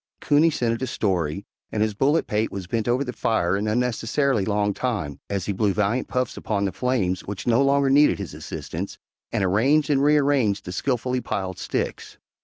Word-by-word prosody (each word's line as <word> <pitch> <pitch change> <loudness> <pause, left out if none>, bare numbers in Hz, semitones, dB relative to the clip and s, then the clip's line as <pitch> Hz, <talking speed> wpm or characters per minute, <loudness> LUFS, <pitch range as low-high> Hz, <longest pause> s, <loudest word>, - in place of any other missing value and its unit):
Coonie 150 +3 +4
scented 120 -6 -1
a 130 - -1
story, 95 -5 -1 0.3
and 105 - +1
his 110 -1 0
bullet 145 +9 +2
pate 110 +1 -1
was 95 -2 -5
bent 110 +5 -2
over 125 +3 +2
the 125 -2 -5
fire 95 -7 +1
an 105 +2 -1
unnecessarily 120 +1 +1
long 105 -1 +1
time, 100 - -3
as 100 -2 -2
he 100 - -1
blew 100 0 +1
valiant 105 +4 0
puffs 125 -1 -1
upon 100 -2 -1
the 95 - -1
flames 100 -5 0
which 100 -1 -5
no 120 +2 +3
longer 140 0 +3
needed 145 +2 +5
his 100 -5 -6
assistance, - - -6 0.3
and - - 0
arranged 135 +11 +3
and 135 -1 +3
rearranged 140 -9 +2
his 90 - -5
skilfully 125 +1 -1
piled 95 -5 -4
sticks. - - -4
115 Hz, 190 wpm, -24 LUFS, 100-130 Hz, 0.3 s, needed